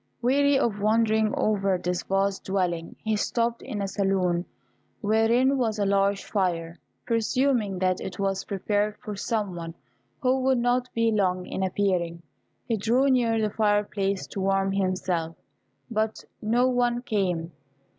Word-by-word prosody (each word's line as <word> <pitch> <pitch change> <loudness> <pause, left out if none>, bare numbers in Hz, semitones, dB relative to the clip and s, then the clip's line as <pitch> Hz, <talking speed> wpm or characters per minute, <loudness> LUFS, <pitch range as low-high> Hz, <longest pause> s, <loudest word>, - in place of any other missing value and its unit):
Weary 280 +3 +3
of 225 -6 0
wandering 220 0 +3
over 195 -3 +1
this 180 0 -2
vast 195 0 -1
dwelling, 180 -4 -1
he 220 -1 +1
stopped 235 +2 0
in 205 -2 -4
a - - -1
saloon, 190 -3 0 0.6
wherein 230 +5 +3
was 220 -3 0
a 205 - +1
large 200 0 +2
fire. 170 -4 -1 0.3
Presuming 230 -3 +1
that 185 0 0
it 190 - -6
was 195 -1 -1
prepared 205 +1 -1
for 210 - -7
some 205 -3 -2
one, 165 -1 -6 0.5
who 255 +1 +3
would 260 0 +2
not 245 +1 +1
be 230 0 +2
long 185 -4 +1
in 190 - -4
appearing, 180 -3 0 0.4
he 230 -3 0
drew 245 +6 +2
near 230 -3 +2
the 215 -1 -1
fireplace 205 -2 0
to - - -7
warm 195 0 +1
himself; 185 -4 -1 0.6
but 220 0 -1 0.2
no 235 +4 +2
one 245 -1 +1
came. 180 -7 -1
205 Hz, 145 wpm, -26 LUFS, 190-230 Hz, 0.6 s, Weary